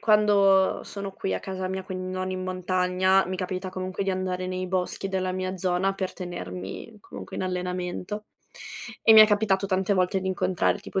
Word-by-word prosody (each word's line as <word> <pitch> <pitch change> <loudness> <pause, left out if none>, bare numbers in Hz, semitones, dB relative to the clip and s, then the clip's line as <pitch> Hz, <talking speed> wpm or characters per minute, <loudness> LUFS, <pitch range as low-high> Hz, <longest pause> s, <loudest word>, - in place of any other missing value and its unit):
quando 200 -3 +4
sono 200 -1 -6
qui 95 - -2
a 95 - -3
casa 190 -1 -4
mia, 190 0 -3
quindi 185 0 -5
non 185 0 -2
in 185 0 -3
montagna, 185 0 +2
mi 185 - -3
capita 185 0 -3
comunque 185 +1 -3
di 195 - 0
andare 185 -1 -2
nei 185 0 -3
boschi 185 +1 -1
della 185 -1 -1
mia 185 0 -3
zona 185 +2 0
per 190 -1 -3
tenermi 100 - -7
comunque - - -9
in - - -2
allenamento, 180 +3 -3 0.8
e 220 - +7
mi 220 - +10
è 215 - +10
capitato 205 -2 +2
tante 190 +1 +1
volte 185 +1 +1
di 190 - -2
incontrar 185 0 +1
tipo 190 - -3
185 Hz, 185 wpm, -26 LUFS, 185-195 Hz, 0.8 s, mi